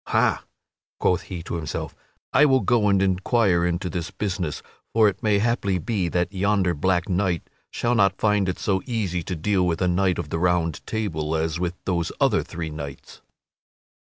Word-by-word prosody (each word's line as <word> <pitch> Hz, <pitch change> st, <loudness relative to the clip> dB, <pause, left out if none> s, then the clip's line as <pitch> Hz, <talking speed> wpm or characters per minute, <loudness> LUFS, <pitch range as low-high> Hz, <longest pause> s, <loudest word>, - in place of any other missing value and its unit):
"Ha," -, -, +2 dB, 0.6 s
quoth 90 Hz, -, +2 dB
he 90 Hz, -3 st, -5 dB
to -, -, -6 dB
himself, 75 Hz, -3 st, -4 dB, 0.4 s
"I 150 Hz, -, +6 dB
will 130 Hz, -2 st, +4 dB
go 115 Hz, -4 st, +2 dB
and 100 Hz, -1 st, +3 dB
inquire 95 Hz, -1 st, +2 dB
into 85 Hz, +1 st, -1 dB
this 85 Hz, 0 st, -3 dB
business, 95 Hz, -5 st, -3 dB, 0.3 s
for 110 Hz, -1 st, +5 dB
it 100 Hz, -, -2 dB
may 105 Hz, -2 st, +3 dB
haply 100 Hz, -3 st, +1 dB
be 90 Hz, 0 st, -1 dB
that 90 Hz, +3 st, -1 dB
yonder 100 Hz, -2 st, +1 dB
black 90 Hz, +3 st, +1 dB
knight 90 Hz, -3 st, 0 dB, 0.2 s
shall 120 Hz, 0 st, 0 dB
not 100 Hz, -4 st, +3 dB
find 105 Hz, -3 st, +2 dB
it -, -, +1 dB
to -, -, -16 dB
be -, -, -8 dB
so 95 Hz, -2 st, +1 dB
easy 100 Hz, -8 st, -1 dB
to 90 Hz, +2 st, -4 dB
deal 90 Hz, +2 st, +1 dB
with 80 Hz, -2 st, 0 dB
a 90 Hz, -, +1 dB
knight 90 Hz, +1 st, +2 dB
of 85 Hz, -4 st, -4 dB
the 80 Hz, -, -1 dB
Round 85 Hz, -2 st, +1 dB
Table 80 Hz, -8 st, -2 dB
as 80 Hz, +1 st, -1 dB
with 90 Hz, 0 st, -2 dB
those 85 Hz, -3 st, -1 dB
other -, -, +3 dB
three 80 Hz, -2 st, -6 dB
knights." 70 Hz, -2 st, -8 dB
90 Hz, 190 wpm, -24 LUFS, 85-100 Hz, 0.6 s, I